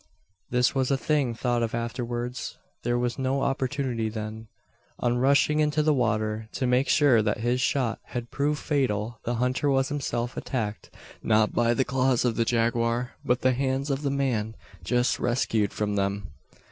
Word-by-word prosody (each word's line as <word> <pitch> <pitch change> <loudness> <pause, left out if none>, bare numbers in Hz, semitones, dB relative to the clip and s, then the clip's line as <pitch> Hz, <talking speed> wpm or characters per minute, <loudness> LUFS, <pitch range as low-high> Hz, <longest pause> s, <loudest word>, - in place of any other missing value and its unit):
This 125 0 +2
was 130 -2 +1
a 135 - +2
thing 140 -5 0
thought 120 0 0
of 115 -1 -1
afterwards 120 +1 -4 0.2
there 120 0 0
was 120 +1 -1
no 135 +1 0
opportunity 130 -4 -1
then. 110 0 -6 0.5
On 120 0 0
rushing 140 +3 +3
into 150 0 +2
the 155 0 +3
water, 110 -3 0
to 130 - -1
make 125 +2 +2
sure 140 -7 +5
that 105 0 -1
his 120 +2 +1
shot 125 -3 0
had 120 -1 -6
proved 145 +1 0
fatal, 115 -6 -1
the 120 - -1
hunter 125 +4 0
was 135 -1 +2
himself 125 -4 -2
attacked; 110 -5 -3 0.3
not 110 -1 +2
by 120 0 +2
the 130 - +1
claws 130 -2 +1
of 120 -2 +1
the 115 - +1
jaguar, 115 +1 +1
but 125 0 +1
the 130 0 +3
hands 135 +2 -1
of 135 +1 -1
the 145 - 0
man 125 -6 -1 0.3
just 120 +8 +1
rescued 115 -4 +1
from 105 -1 -2
them. 100 -1 -2
125 Hz, 170 wpm, -26 LUFS, 115-135 Hz, 0.5 s, sure